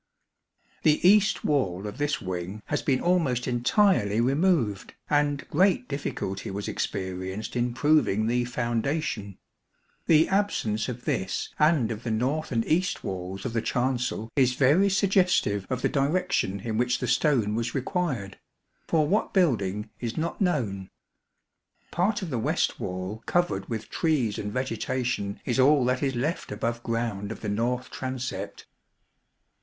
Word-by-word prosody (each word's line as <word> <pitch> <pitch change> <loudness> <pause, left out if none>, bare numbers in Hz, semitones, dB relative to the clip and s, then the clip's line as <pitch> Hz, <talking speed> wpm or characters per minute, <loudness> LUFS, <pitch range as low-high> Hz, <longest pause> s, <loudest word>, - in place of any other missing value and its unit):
The 155 +3 +4
east 210 +1 +4
wall 100 -10 0
of 105 +6 -6
this 145 0 0
wing 95 +3 -5
has 145 - -1
been 130 -3 +1
almost 160 -9 +1
entirely 120 - +2
removed, 135 - +1 0.2
and 145 -1 +1
great 180 -6 +3
difficulty 100 -9 -4
was 100 +1 -4
experienced 95 +2 -4
in 120 0 0
proving 130 -8 +3
the 120 +2 +1
foundation. 120 - -2 0.7
The 160 0 +5
absence 120 - 0
of 120 0 -7
this 95 0 -1
and 150 -7 +3
of 110 -1 -5
the 120 - -4
north 130 +9 -1
and 115 -2 0
east 180 +4 +1
18 - - -6
walls 95 +3 -6
of 125 - -3
the 115 - +1
chancel 125 -2 -1
is 130 -3 +4
very 150 +10 +4
suggestive 185 - +2
of 130 -1 -2
the - - +4
direction 140 - 0
in 110 0 -3
which 125 0 +2
the 125 - -3
stone 125 -4 +2
was 115 +1 -2
required; 160 - -2 0.5
for 155 -2 +2
what 205 +6 0
building 105 - +1
is 120 -2 -4
not 170 +6 -3
known. 110 - 0 1.0
Part 195 +4 0
of 170 - -5
the 125 - -1
west - - 0
wall 95 +4 -4
covered 175 - 0
with 110 -2 -5
trees 135 -10 0
and 105 - -4
vegetation 125 -4 -2
is 125 0 0
all 135 0 +5
that 125 0 +1
is 135 -2 0
left 145 +8 -2
above 115 +3 -2
ground 115 -4 -2
of - - -7
the 105 - -3
north 120 +4 -1
transept. 130 -7 -5
125 Hz, 150 wpm, -26 LUFS, 105-150 Hz, 1.0 s, The